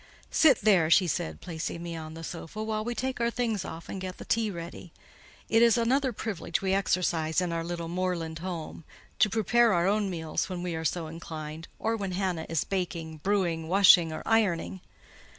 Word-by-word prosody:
"Sit 280 -7 +5
there," 190 -7 +4
she 180 +3 +6
said, 80 - -3
placing 170 0 -5
me 170 -1 -5
on 160 -1 -7
the 165 - -8
sofa, 175 +5 -6
"while 215 -1 -2
we 240 +2 -3
take 260 +1 -2
our 235 - +2
things 230 -5 -1
off 165 +1 -8
and 195 - -6
get 185 0 -5
the - - -9
tea 225 -1 +1
ready; 170 -1 -8 0.6
it 225 - +4
is 235 +1 +6
another 260 +3 +2
privilege 205 -6 -3
we 190 -1 0
exercise 175 -5 +1
in 180 -2 -1
our 165 0 -1
little 170 0 -4
moorland 170 -2 -2
home—to 170 +3 -3
prepare 225 +2 +3
our 175 -1 +2
own 205 +1 +1
meals 160 -1 -2
when 180 -1 -4
we 180 -1 -2
are 160 0 -3
so 165 +1 -1
inclined, 160 0 -7
or 225 +1 0
when 195 -4 -3
Hannah 180 -3 -2
is 165 -3 +1
baking, 170 -4 -3
brewing, 170 -2 0
washing, 180 -2 +6
or 155 - -5
ironing." 190 -4 +1
180 Hz, 190 wpm, -28 LUFS, 165-215 Hz, 0.6 s, she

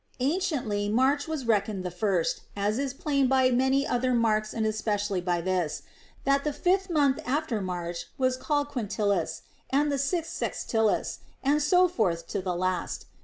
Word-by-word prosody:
Anciently 260 - 0
March 265 +7 +2
Avas 305 -6 -4
reckoned 205 -3 +1
the 180 - -3
first, 180 -2 0
as 205 +4 0
is 275 -1 -1
plain 275 0 +1
by 260 -1 +4
many 265 +3 +2
other 250 +1 +1
marks 215 -2 +2
and 220 -1 -1
especially 210 -3 -1
by 175 -1 0
this, 180 -3 -1 0.4
that 275 0 +2
the 300 - 0
fifth 375 +5 +1
month 285 -5 +2 0.3
from 215 -5 -2
March 175 -2 -4
was 255 -1 +2
called 290 +2 -1
Quintilis, 210 -6 -1 0.3
and 290 +2 +2
the 280 - 0
sixth 330 +4 -1
Sextilis, 220 -2 0 0.2
and 290 +2 +3
so 360 +5 +5
forward 180 - 0
to 200 - -2
the 180 -1 -2
last. 185 0 -2
240 Hz, 165 wpm, -27 LUFS, 200-280 Hz, 0.4 s, so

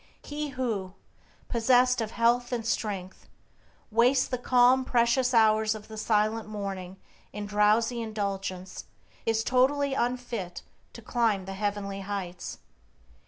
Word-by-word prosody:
He 300 +1 -4
who, 220 -8 -3 0.5
possessed 250 +1 +3
of 220 - -2
health 240 +2 +1
and 235 -3 -2
strength, 200 -5 -3 0.6
wastes 245 +4 +4
the 250 - -3
calm, 250 +1 +4
precious 245 +1 +2
hours 220 -2 +4
of 215 0 -11
the 220 - -8
silent 215 0 0
morning 195 -3 -5 0.3
in 210 0 -5
drowsy 215 +3 +2
indulgence 195 -4 -4 0.4
is 225 0 +2
totally 270 +3 +2
unfit 240 -8 -3 0.3
to 235 - -11
climb 215 -5 0
the 195 - -6
heavenly 200 0 -3
heights. 195 -3 -5
220 Hz, 120 wpm, -28 LUFS, 205-245 Hz, 0.6 s, wastes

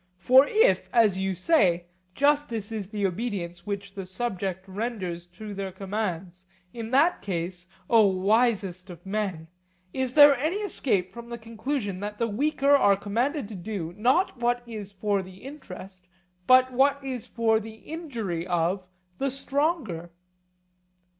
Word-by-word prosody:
For 255 +10 +6
if, 445 +3 +3
as 215 -5 +4
you 190 0 -1
say, 180 - +3 0.3
justice 285 -7 +1
is 210 -4 -4
the 205 -1 -2
obedience 180 -3 -3
which 200 -1 -4
the 195 -2 -6
subject 190 -2 -3
renders 190 -4 -4
to 205 +4 -9
their 195 -1 -4
commands, 185 -2 -4 0.3
in 230 -2 -6
that 285 +8 +3
case, 180 -1 -4 0.2
O 225 -3 +6
wisest 195 -1 +1
of 175 +1 -11
men, 190 -5 -3 0.5
is 260 -1 -2
there 290 -2 +9
any 310 +8 0
escape 255 - 0
from 235 0 -9
the 235 - -5
conclusion 225 -2 -4
that 210 +1 -5
the 230 - 0
weaker 280 +5 +1
are 200 -8 +5
commanded 235 +6 -1
to - - -8
do, 180 -3 -5
not 255 - +2
what 240 0 +1
is 210 -4 -7
for 200 0 0
the 185 0 -13
interest, 190 -9 -10 0.4
but 255 0 +6
what 275 +2 +4
is 255 -4 -4
for 225 -1 +2
the 220 0 -9
injury 225 - -5
of 175 +2 0 0.4
the 275 - +1
stronger? 275 - -1
210 Hz, 145 wpm, -26 LUFS, 185-255 Hz, 0.5 s, there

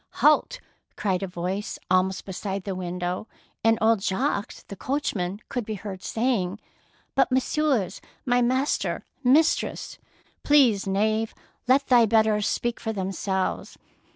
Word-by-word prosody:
^'Halt!" - - +3 0.4
cried 190 -3 -1
a 195 - -2
voice 185 +3 -4
almost 185 +1 +2
be 195 - -7
side 195 +1 -4
the 195 - -3
window, 180 +2 -3 0.4
and 225 0 +4
old 220 -2 +3
Jacques 200 +2 -1
the 200 - -7
coachman 205 -7 -2
could 245 -2 -3
be 215 0 -4
heard 195 -1 -7
saying, 220 -5 -1 0.2
— - - -36
" - - -38
But, 270 -1 +3
messieurs, 260 -4 +1 0.2
my 245 -1 +3
master 260 +4 0 0.2
and 250 +1 +5
mis 320 +2 +5
tress - - -6
— - - -34
" - - -43
Peace, 250 -10 +4
knave, 215 +3 0 0.3
let 270 +2 +4
thy 240 -3 +5
betters 215 -1 +3
speak 240 0 -1
for 225 - -3
themselves." 190 -1 -2
215 Hz, 155 wpm, -25 LUFS, 190-245 Hz, 0.4 s, and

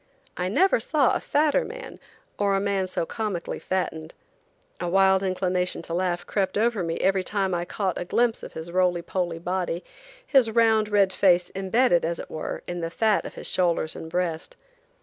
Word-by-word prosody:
I 180 +1 -2
never 370 - +3
saw 280 +2 +2
a - - 0
fatter 305 +11 +2
man, - - -9 0.4
or 200 -1 +2
a - - +2
man 195 -1 0
so 180 - -1
comically 200 -3 -4
fattened. 160 -4 -3 0.6
A 175 - -2
wild 190 +1 +4
inclination 185 -1 -1
to 165 - -5
laugh 175 0 -1
crept 195 -2 -1
over 225 -1 +1
me 165 -1 -2
every 190 0 +2
time 195 0 -1
I 175 0 -1
caught 190 -1 -2
a - - -4
glimpse 235 +4 +1
of - - -9
his 160 +2 -7
roly 180 -1 +1
poly 175 -3 -2
body, 180 0 -2 0.4
his 265 -5 +4
round 220 -1 +3
red 200 -2 +3
face 180 -2 +3
embedded, 195 0 +2
as 170 +1 -1
it - - -8
were, 155 - -5
in 175 0 -4
the 165 -1 -3
fat 215 +4 +1
of - - -11
his - - -7
shoulders 170 -3 +1
and 160 - -7
breast. 170 -2 -2
185 Hz, 190 wpm, -25 LUFS, 175-205 Hz, 0.6 s, wild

